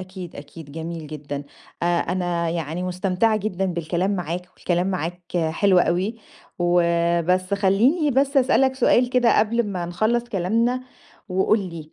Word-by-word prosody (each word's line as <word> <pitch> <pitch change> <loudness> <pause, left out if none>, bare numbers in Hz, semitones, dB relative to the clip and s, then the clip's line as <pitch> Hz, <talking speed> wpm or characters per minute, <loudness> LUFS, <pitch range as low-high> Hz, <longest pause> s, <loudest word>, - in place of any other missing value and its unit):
أكيد، 185 -2 -9
أكيد، 145 0 -11
جميل 165 0 -6
جدًا. 145 -1 -6 0.4
أ - - +2
أنا 175 -1 0
يعني 165 +1 -3
مُستمتعة 185 +4 +1
جدًا 195 -3 -2
بالكلام 175 +2 -1
معاك 180 +1 -4
والكلام 175 0 0
معاك 180 -2 -3 0.3
حلو 185 +2 +3
أوي، 185 +6 +1 0.4
وبس 175 +1 +2
خلّيني 230 - +3
بس 275 +2 +1
أسألك 265 0 +3
سؤال 250 -2 +3
كده 245 -3 +3
قبل 230 +2 +2
ما 180 -4 -3
نخلّص 220 +7 0
كلامنا 230 +4 0 0.5
وقُل 190 +4 +2
لي 165 -5 -7
180 Hz, 135 wpm, -23 LUFS, 170-215 Hz, 0.5 s, حلو